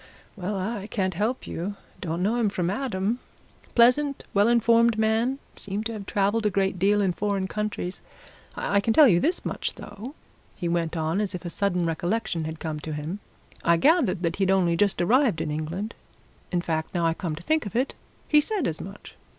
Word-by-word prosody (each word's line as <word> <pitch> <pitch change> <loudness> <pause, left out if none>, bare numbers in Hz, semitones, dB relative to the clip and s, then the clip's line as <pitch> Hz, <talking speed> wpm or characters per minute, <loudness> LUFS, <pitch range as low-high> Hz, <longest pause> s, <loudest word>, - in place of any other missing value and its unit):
Well, 195 +1 -3
I 200 +1 -3
can't 190 -4 -1
help 215 +8 -1
you 190 +5 -4 0.2
don't 170 0 -2
know 220 +5 +1
him 225 -3 +2
from 180 -2 -1
Adam. 225 -2 -1 0.6
Pleasant, 260 +4 +4
well 205 +2 +4
informed 235 -1 +4
man 220 +4 +2 0.2
seemed 200 +2 -4
to 230 - -2
have 205 -3 -7
travelled 205 +2 +1
a - - +3
great 190 -1 0
deal 205 +2 +3
in 185 -2 +1
foreign 200 0 -1
countries. 210 -3 -3 0.5
I 200 - +1
can 225 +2 +1
tell 305 -3 +9
you 175 -7 +5
this 345 - 0
much, - - -3
though," 240 +9 -9 0.4
he 175 - -3
went 170 -1 -1
on, 160 +5 0
as 205 -2 -2
if 180 - -7
a 170 - -3
sudden 180 -3 0
recollection 170 +1 -1
had 160 0 -5
come 155 -2 -4
to 155 +1 -5
him; 155 +6 -4 0.4
"I 170 0 +4
gathered 225 - +3
that 170 -1 0
he'd 190 -1 +1
only 180 -3 +3
just 200 +3 +2
arrived 230 - +3
in 155 - -2
England 170 +8 -3 0.6
in 175 -2 +1
fact, 160 0 -3
now 170 -1 +1
I 165 - +3
come 165 -2 -4
to 165 - -10
think 310 - +1
of 205 - -9
it, 255 +3 +1 0.3
he 300 -1 +5
said 395 -1 -1
as 155 - -2
much. 195 +2 -10
195 Hz, 200 wpm, -26 LUFS, 175-225 Hz, 0.6 s, tell